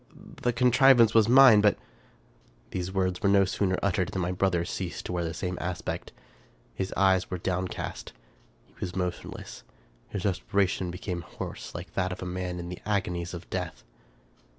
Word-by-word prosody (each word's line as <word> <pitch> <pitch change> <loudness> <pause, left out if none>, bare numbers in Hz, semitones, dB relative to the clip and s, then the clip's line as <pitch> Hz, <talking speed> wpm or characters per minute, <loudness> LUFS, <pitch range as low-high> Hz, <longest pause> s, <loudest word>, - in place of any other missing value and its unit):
The 125 - +2
contrivance 125 -1 +5
was 110 -1 +5
mine, 125 -4 +8
but 105 -1 +4 0.5
" - - -33
These 90 0 -3
words 95 -1 -1
were 100 - +3
no 100 0 +5
sooner 95 0 0
uttered, 95 -2 +1
than 95 -2 -3
my 90 - -1
brother 90 -2 +1
ceased 90 0 -5
to - - -4
wear 90 -1 -1
the 80 - -2
same 90 +3 -4
aspect. 90 0 -4 0.6
His 95 +9 -3
eyes 95 -1 +3
were 90 - -3
downcast; 90 +1 -3 0.5
he - - -28
was 90 0 -4
motionless; 90 -1 -5 0.5
his 100 0 -4
respiration 95 -1 0
became 90 0 -4
hoarse, 85 - -8
like - - -7
that 95 -1 0
of 90 - -6
a - - -5
man 90 0 -3
in 85 0 -6
the 90 - -7
agonies 90 -4 -2
of 85 - -9
death. - - -4
95 Hz, 175 wpm, -28 LUFS, 90-100 Hz, 0.6 s, mine